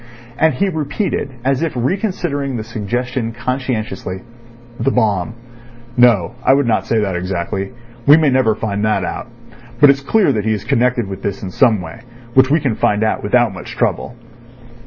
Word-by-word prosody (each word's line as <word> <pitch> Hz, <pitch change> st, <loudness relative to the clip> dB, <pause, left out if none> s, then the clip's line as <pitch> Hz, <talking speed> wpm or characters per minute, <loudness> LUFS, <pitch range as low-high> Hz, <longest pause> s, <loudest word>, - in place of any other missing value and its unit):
And 160 Hz, +3 st, +2 dB
he 200 Hz, -, +1 dB
repeated, 155 Hz, -1 st, -2 dB, 0.2 s
as 135 Hz, +1 st, +1 dB
if 165 Hz, -2 st, -1 dB
reconsidering 145 Hz, -, -1 dB
the 110 Hz, -, -4 dB
suggestion 115 Hz, +2 st, -3 dB
conscientiously: 120 Hz, -5 st, -3 dB, 0.6 s
"The 120 Hz, +4 st, +2 dB
bomb. 110 Hz, -4 st, 0 dB, 0.6 s
No, 115 Hz, -8 st, +4 dB
I 135 Hz, -, +5 dB
would 140 Hz, -1 st, +2 dB
not 115 Hz, -2 st, 0 dB
say 115 Hz, -, +1 dB
that 95 Hz, -3 st, -1 dB
exactly. 90 Hz, +2 st, -3 dB, 0.4 s
We 145 Hz, +2 st, +9 dB
may 155 Hz, -4 st, +3 dB
never 130 Hz, -4 st, +3 dB
find 105 Hz, -2 st, -3 dB
that 105 Hz, -4 st, +1 dB
out. -, -, -5 dB, 0.5 s
But 145 Hz, 0 st, +8 dB
it's 140 Hz, 0 st, -2 dB
clear 190 Hz, +3 st, +2 dB
that 105 Hz, -3 st, -1 dB
he 110 Hz, -, +2 dB
is 105 Hz, -, -4 dB
connected 120 Hz, -1 st, +1 dB
with 95 Hz, 0 st, -7 dB
this 100 Hz, 0 st, -4 dB
in 95 Hz, -, -5 dB
some 110 Hz, -2 st, +3 dB
way, 80 Hz, -2 st, -9 dB, 0.3 s
which 130 Hz, +1 st, +5 dB
we 155 Hz, +4 st, +3 dB
can 135 Hz, -6 st, 0 dB
find 105 Hz, 0 st, +1 dB
out 110 Hz, -, 0 dB
without 120 Hz, 0 st, +2 dB
much -, -, -8 dB
trouble." 120 Hz, -, -1 dB
120 Hz, 180 wpm, -17 LUFS, 105-135 Hz, 0.6 s, We